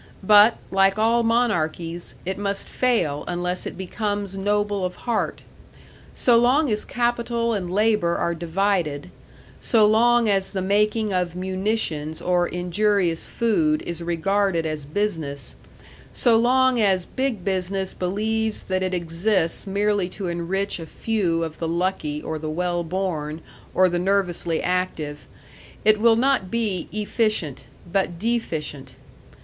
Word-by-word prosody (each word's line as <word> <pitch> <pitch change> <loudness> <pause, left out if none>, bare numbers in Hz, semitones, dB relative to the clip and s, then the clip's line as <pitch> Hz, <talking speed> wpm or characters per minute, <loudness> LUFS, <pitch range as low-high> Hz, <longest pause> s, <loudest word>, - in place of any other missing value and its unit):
But, 210 +3 +7
like 195 +1 +3
all 230 +2 +3
monarchies, 175 -8 0
it 190 +2 -3
must 200 -1 -1
fail 220 - 0
unless 180 +1 -2
it - - -7
becomes 205 +1 -3
noble 205 0 0
of 180 0 -2
heart. 235 -3 -2 0.7
So 240 -2 +4
long 260 +3 +3
as 210 - -1
capital 235 -1 0
and 185 -4 -3
labor 210 -4 +2
are 170 - 0
divided, 170 -2 -1 0.5
so 220 -3 +4
long 235 +2 +4
as 195 -2 +1
the 190 - -3
making 210 +2 +1
of 180 -2 -1
munitions 185 -5 -2
or 180 -1 +1
injurious 180 -1 0
food 305 +7 +1
is 170 0 -5
regarded 175 +1 0
as 155 -2 -3
business, 155 -5 -3 0.6
so 235 -3 +3
long 255 +2 +3
as 190 -3 +2
Big 260 -8 -3
Business 190 0 -1
believes 215 +4 -1
that 185 0 -1
it 185 0 -1
exists 170 +2 -1
merely 200 -1 0
to 195 +1 -6
enrich 180 +3 -2
a 165 - -7
few 180 -5 -1
of 160 -1 -6
the 165 - -2
lucky 165 -3 -2
or 160 -1 -4
the 155 0 -4
well 175 +2 -1
born 160 -3 -3 0.4
or 185 - +5
the 175 -1 -1
nervously 180 -3 0
active, 180 -5 -2 0.6
it 215 0 +5
will 230 0 +6
not 250 -5 +1
be 210 -6 -2
efficient, 215 - -1 0.2
but 175 -1 -1
deficient. 165 - -3
190 Hz, 135 wpm, -23 LUFS, 170-215 Hz, 0.7 s, But